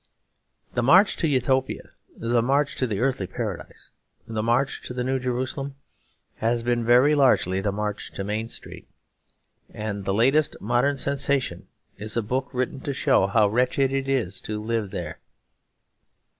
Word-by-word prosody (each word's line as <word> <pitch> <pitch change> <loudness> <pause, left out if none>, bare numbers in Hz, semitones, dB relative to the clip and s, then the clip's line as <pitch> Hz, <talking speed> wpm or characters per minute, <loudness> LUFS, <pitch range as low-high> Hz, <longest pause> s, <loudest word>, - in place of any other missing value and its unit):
The 120 - +1
march 185 - +5
to 165 - +1
Utopia, 130 -1 0 0.3
the 115 0 +1
march 140 +4 +1
to 130 - +1
the 105 -3 -2
Earthly 125 -6 0
Paradise, - - -6 0.4
the 110 -1 -2
march 120 +5 +1
to 125 - -7
the 125 - -1
New 130 +1 0
Jerusalem, 130 +2 -3 0.6
has 115 +1 0
been 120 0 +1
very 125 +5 +5
largely 125 -10 +3
the 100 0 0
march 105 +1 -4
to 95 - -4
Main 110 +3 -3
Street. - - -8 0.8
And 105 -2 -4
the 95 - -1
latest 135 +7 +3
modern 125 +6 +1
sensation 140 0 0 0.3
is 110 +2 -3
a 115 - +1
book 130 +5 -2
written 130 +1 -2
to 140 +1 -3
show 95 - +3
how 105 +1 +4
wretched 130 +5 +1
it 135 0 -1
is 115 -9 -1
to 105 0 -4
live 110 -1 -2
there. 85 -4 -6
120 Hz, 155 wpm, -25 LUFS, 110-135 Hz, 0.8 s, march